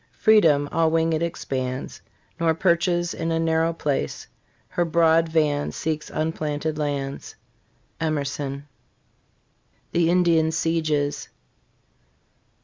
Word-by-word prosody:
Freedom 165 -10 +4
all 165 -1 +2
winged 165 0 +1
expands, 130 -6 -4 0.4
Nor 165 -1 +2
perches 175 0 +1
in 165 0 -3
a 165 - +1
narrow 165 0 +1
place; 145 - -2 0.4
Her 175 - 0
broad 165 0 +3
van 150 -3 +1
seeks 155 -1 -3
unplanted 155 -1 -2
lands. 140 -2 -3 0.6
Emerson. 140 -2 -3 1.2
THE 170 -1 +2
INDIAN 170 -3 +3
SIEGES. 155 -3 -1
160 Hz, 95 wpm, -24 LUFS, 145-165 Hz, 1.2 s, Freedom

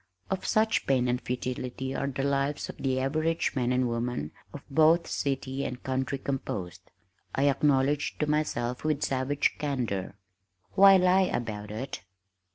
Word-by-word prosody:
"Of 190 - -2
such 220 -1 +2
pain 130 -2 +3
and 125 0 0
futility 125 +1 -4
are 140 - -2
the 135 0 -3
lives 140 +1 0
of - - -8
the 130 -1 0
average 155 +5 0
man 125 -2 +1
and 125 0 +2
woman 115 -10 -2 0.2
of 145 - -9
both 160 +4 +4
city 135 0 -2
and 125 0 -5
country 130 +1 -1
composed," 115 -10 -5 0.5
I 140 +2 +3
acknowledged 140 0 +2
to - - +3
myself 140 -5 -1
with 155 -2 0
savage 135 +2 0
candor, 120 -10 -2 0.6
"Why 195 0 +8
lie 185 +1 +4
about 105 -3 -3
it?" 115 +1 -5
135 Hz, 150 wpm, -28 LUFS, 125-150 Hz, 0.6 s, Why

